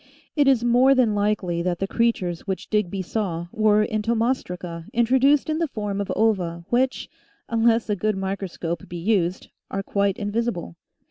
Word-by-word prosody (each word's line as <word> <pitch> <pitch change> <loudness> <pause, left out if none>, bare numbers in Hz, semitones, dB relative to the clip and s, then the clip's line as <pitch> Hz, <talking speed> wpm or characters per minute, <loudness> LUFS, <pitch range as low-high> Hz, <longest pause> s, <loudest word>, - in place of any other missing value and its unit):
It 290 -3 +3
is 260 -4 +4
more 250 +3 +5
than 245 -5 +3
likely 205 -4 0
that 175 0 -1
the 195 - -1
creatures 195 -7 -1
which 190 -1 -4
Digby 200 -3 0
saw 175 -4 -2
were 215 -1 +3
entomostraca 215 -7 -2
introduced 265 +5 +3
in 310 0 -1
the 335 - +1
form 210 -5 -3
of 200 - -3
ova 180 -6 0
which, 255 +2 +1 0.4
unless 230 0 +2
a 210 - 0
good 210 +1 -1
microscope 190 -3 -4
be 175 - -6
used, 185 -1 0 0.2
are 195 - -3
quite 200 -1 0
invisible. 205 - -2
210 Hz, 155 wpm, -23 LUFS, 185-235 Hz, 0.4 s, more